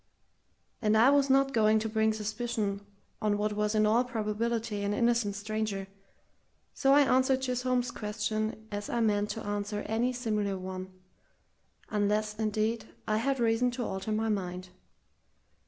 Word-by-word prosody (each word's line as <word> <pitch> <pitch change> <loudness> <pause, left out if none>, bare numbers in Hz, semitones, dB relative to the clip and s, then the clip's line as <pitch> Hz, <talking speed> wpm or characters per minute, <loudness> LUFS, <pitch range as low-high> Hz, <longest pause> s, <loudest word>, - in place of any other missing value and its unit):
And 215 -1 +3
I 240 +5 +6
was 280 -1 +3
not 270 0 +3
going 220 -1 +4
to 220 +1 -1
bring 220 0 +2
suspicion 215 -1 -2 0.4
on 210 -1 +1
what 210 0 0
was 210 +1 0
in 215 0 +4
all 225 +4 +4
probability 225 -2 -2
an 205 +1 -1
innocent 235 -4 +1
stranger, 210 -1 -3 0.9
so 270 0 +3
I 290 - +7
answered 260 -1 +3
Chisholm's 250 -1 0
question 215 0 -3
as 205 0 -4
I 240 - -1
meant 210 -2 +1
to 225 - -5
answer 205 0 -2
any 230 +3 0
similar 210 -5 -1
one 185 0 -6 1.0
unless, 210 0 0
indeed, 215 +1 -1 0.2
I 215 - +2
had 270 +4 0
reason 230 +1 +2
to 245 - -1
alter 190 +2 -4
my 220 +1 0
mind. 185 -3 -3
215 Hz, 150 wpm, -30 LUFS, 210-235 Hz, 1.0 s, I